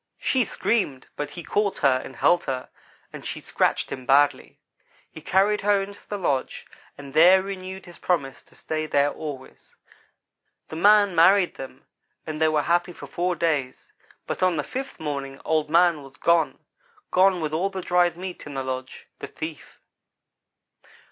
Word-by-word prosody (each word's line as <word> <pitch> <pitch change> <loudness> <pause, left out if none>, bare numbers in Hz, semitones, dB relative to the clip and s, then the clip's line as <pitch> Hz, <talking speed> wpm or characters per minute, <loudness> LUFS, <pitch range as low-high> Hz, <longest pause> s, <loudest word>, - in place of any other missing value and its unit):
She 255 -3 +1
screamed, 145 - -1
but 145 -1 -4
he 175 - -9
caught 205 +4 0
her 130 -1 +4
and 135 - -10
held 175 0 +3
her, 130 -2 -4 0.4
although - - -9
she - - -5
scratched - - 0
him 130 -1 -7
badly. 145 +1 +2 0.5
He 160 - -11
carried 200 +5 +2
her 205 0 +3
into 200 +1 -10
the 205 - -3
lodge 140 -9 -2 0.3
and 140 -1 -10
there 180 +4 +6
renewed 190 -1 -7
his 175 -1 -14
promise 140 -7 -1
to - - -25
stay 155 0 -4
there 145 -1 +2
always. 145 -4 -9 0.9
The - - -7
man 205 +3 +5
married 180 +3 +5
them, 130 0 -10 0.4
and 155 0 -5
they 160 - +5
were 155 -1 +1
happy 175 +1 +1
for - - -10
four 180 +1 -2
days, 150 -6 -2 0.3
but - - -4
on 185 -2 +3
the 150 - -1
fifth 265 - -6
morning 140 -3 -5
Old 155 -1 +1
man 170 -1 +4
was 135 0 -14
gone 170 -1 +2 0.5
gone 185 0 +4
with 155 -2 -3
all 180 +5 0
the 190 -2 -6
dried 175 -1 +2
meat 180 -3 -7
in 145 - -8
the 135 - -2
lodge 130 0 -6
the - - -6
thief. 155 -1 -8
165 Hz, 170 wpm, -24 LUFS, 145-185 Hz, 0.9 s, there